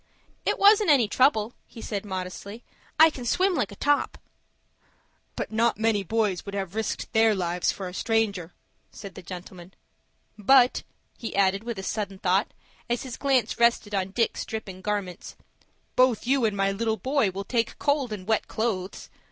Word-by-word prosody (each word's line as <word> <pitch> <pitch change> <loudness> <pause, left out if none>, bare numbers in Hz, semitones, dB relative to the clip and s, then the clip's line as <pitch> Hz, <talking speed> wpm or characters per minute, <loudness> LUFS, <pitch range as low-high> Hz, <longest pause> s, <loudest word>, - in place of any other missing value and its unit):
"It - - +2
wasn't 410 0 +5
any 265 -7 +5
trouble," 225 -1 +2
he - - -13
said, 210 -2 -4
modestly. 190 +4 -6 0.4
"I 320 0 +8
can 255 - -8
swim 370 +10 +2
like 210 - -1
a - - -9
top." 290 +6 +1 1.2
"But - - -4
not 230 +2 +2
many 220 -2 +1
boys 205 -1 -1
would 200 0 -7
have 190 -2 -4
risked 220 +2 -3
their 220 -1 +4
lives 175 -1 0
for 190 - -6
a 180 - -8
stranger," 200 -6 -1 0.4
said 200 -2 -10
the - - -10
gentleman. 180 0 -10 0.6
"But," 250 +4 +5 0.4
he 230 - -5
added 195 +1 +2
with 235 -2 -5
a 190 - -5
sudden 200 -1 -3
thought, 190 +3 +1 0.4
as 240 0 -1
his 260 -3 -6
glance 260 -5 +1
rested 235 -3 +2
on 190 -1 0
Dick's 230 +4 -1
dripping 195 -4 -7
garments, 200 -3 -4 0.6
"both 255 -3 +3
you 260 -1 +2
and 210 -2 0
my 195 0 +2
little 220 +2 -1
boy 260 +1 +1
will 195 +1 -6
take 235 -1 -1
cold 285 -4 0
in 200 -3 -6
wet 220 +1 0
clothes. 200 -4 -3
215 Hz, 170 wpm, -26 LUFS, 195-240 Hz, 1.2 s, I